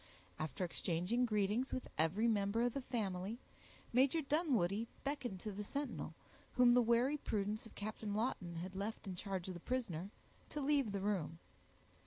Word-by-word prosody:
After 155 +4 -1
exchanging 180 +8 +1
greetings 215 +4 +1
with 255 - -2
every 180 +9 +3
member 210 +1 +2
of 245 -1 +2
the 275 - -2
family, 210 -4 -2 0.6
Major 265 +6 +5
Dunwoodie 235 - +2 0.2
beckoned 270 -9 -2
to 215 - -3
the 205 +1 -4
sentinel, 285 +7 -3 0.4
whom 245 -1 +7
the 245 - +7
wary 240 +5 +4
prudence 210 -4 -1
of - - -16
Captain 210 0 -3
Lawton 205 -6 -1
had 180 +3 -5
left 205 +4 -3
in 190 -2 -4
charge 190 -1 -3
of 185 - -3
the 175 - -7
prisoner, 195 -6 -2 0.4
to 300 - -3
leave 280 -5 +3
the 200 -1 -2
room. 190 -5 0
215 Hz, 165 wpm, -38 LUFS, 190-250 Hz, 0.6 s, whom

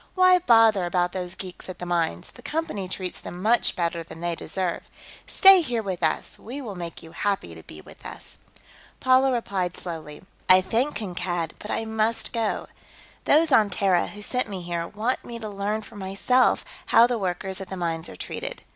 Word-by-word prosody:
Why 370 -1 +6
bother 225 - +5
about 175 0 +1
those 180 0 -4
geeks 185 -1 -7
at 185 - -6
the 180 - -6
mines; 170 - -1
the - - -15
Company 255 - -3
treats 185 -1 -4
them 175 - -8
much 225 +5 +3
better 170 -1 -1
than 165 0 -11
they 170 0 -1
deserve. 175 +2 -3 0.5
Stay 385 -2 +8
here 240 -8 -2
with 185 -3 -4
us; 160 -2 -1
we 250 +6 -7
will 235 -7 -6
make 170 -2 -7
you 160 - -12
happy 195 - -2
to 80 - -11
be 75 -1 -12
with - - -16
us." - - -8 0.6
Paula 260 +1 +4
replied 195 -7 -2
slowly: 160 -3 -7 0.3
"I 185 0 +9
thank 235 +10 0
Kankad, 175 -5 -3
but 210 - -9
I 225 - -1
must 220 +1 0
go. 225 -3 -1 0.6
Those 310 +1 +4
on 215 -5 +5
Terra 190 -2 +2
who 210 0 -7
sent 250 +3 -1
me 190 -3 -5
here 170 -1 -3
want 225 +7 -2
me 235 - -7
to 225 -2 -6
learn 205 +2 -2
for 210 - -13
myself 200 +7 +2 0.2
how 230 +1 +7
the 240 -1 -1
workers 190 0 -2
at 190 - -6
the 190 - -5
mines 165 -1 -3
are - - -10
treated. - - -6
195 Hz, 195 wpm, -25 LUFS, 175-230 Hz, 0.6 s, I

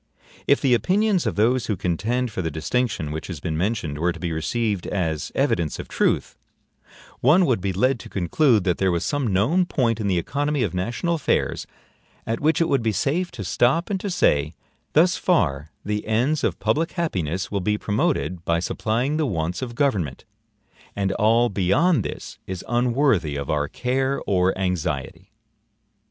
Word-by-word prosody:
If 140 - +4
the 135 -3 +3
opinions 195 - +2
of - - -1
those 120 +4 +2
who 105 - 0
contend 115 +9 -1
for 95 - -3
the 80 - -2
distinction 80 - -1
which 80 +1 -5
has 85 -5 -6
been 80 0 -3
mentioned 85 -5 -2
were 85 +2 +1
to 85 - -8
be 85 0 -3
received 100 +5 -1
as 80 -6 -2
evidence 80 -3 0
of - - -7
truth, - - 0 0.8
one 165 +9 +5
would 120 - +1
be 95 +1 -1
led 125 +7 +1
to - - -10
conclude 105 - +2
that 90 -2 0
there 95 -1 +2
was 85 -1 -1
some 140 -7 -1
known 145 - +2
point 115 -9 0
in 105 - -1
the 95 -2 +1
economy 145 - -1
of - - -2
national 120 - -1
affairs 160 -5 0 0.6
at 115 +1 -2
which 155 +2 +2
it 165 - +2
would 140 -5 +2
be 115 -1 +1
safe 165 - 0
to 115 -5 -6
stop 130 - +1
and 195 - 0
to 200 - -4
say: 75 - +1 0.4
Thus 175 +3 +4
far 75 - +1 0.2
the 105 +1 -2
ends 125 +7 +1
of - - 0
public 165 +2 0
happiness 95 - -2
will 100 -2 -1
be 105 +3 0
promoted 90 -5 -1
by 85 -1 +1
supplying 115 - -1
the 155 -2 +1
wants 85 -2 -2
of 120 -2 -5
government, 100 - -1 0.7
and 100 -1 0
all 115 +3 +3
beyond 100 - +2
this - - -7
is 95 -2 -6
unworthy 120 - +1
of 70 -1 -3
our 75 -1 0
care 130 - -1
or 95 -1 +1
anxiety. 90 -3 -3
110 Hz, 180 wpm, -23 LUFS, 90-135 Hz, 0.8 s, one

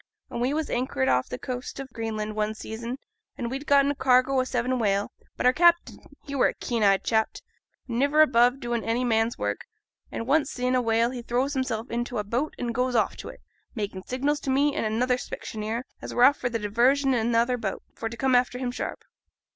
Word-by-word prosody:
An' - - -4
we 250 +3 +1
was 310 +1 -2
anchored 240 - 0
off 125 0 +2
t' 125 - -4
coast 250 - -6
o' 270 - -4
Greenland 215 -2 -4
one 215 0 -1
season, 230 +3 -6 0.4
an' 235 -2 -3
we'd 270 +4 -5
getten 280 0 +5
a - - -4
cargo 260 0 +3
o' - - +3
seven 255 0 -1
whale; 200 -2 +1 0.3
but - - -2
our 250 - +6
captain 345 +3 +3 0.3
he 280 - -7
were 275 - +4
a - - -3
keen 235 -2 -2
eyed 195 -2 +4
chap, 220 -1 +1 0.5
an' 235 -1 -2
niver 290 +3 +5
above 245 -2 +3
doin' 240 -2 -2
any 230 +2 0
man's 225 -1 +1
work; 105 0 -3 0.4
an' 230 - -4
once 285 +2 +2
seein' 250 -3 -1
a 255 - +3
whale 230 0 +2
he 250 -2 -5
throws 250 +4 -1
himself 255 -4 -2
int' 240 +1 -2
a 215 -3 -1
boat 240 +9 -2
an' 240 -1 -2
goes 250 +1 0
off 220 - +2
to - - -7
it, - - -12 0.3
makin' 205 -4 -4
signals 280 +7 -1
to - - -5
me, 280 +2 +3
an' - - -1
another 245 +4 +1
specksioneer 220 -1 -5 0.2
as - - -7
were 245 - +4
off 285 +3 +6
for 245 - -2
diversion 240 +5 +2
i' 245 - +2
another 235 +2 +2
boat, 215 -5 -4
for 225 - -4
to 230 - -9
come 265 +1 +1
after 250 0 +3
him 250 -1 -2
sharp. - - -5
245 Hz, 220 wpm, -26 LUFS, 225-260 Hz, 0.5 s, our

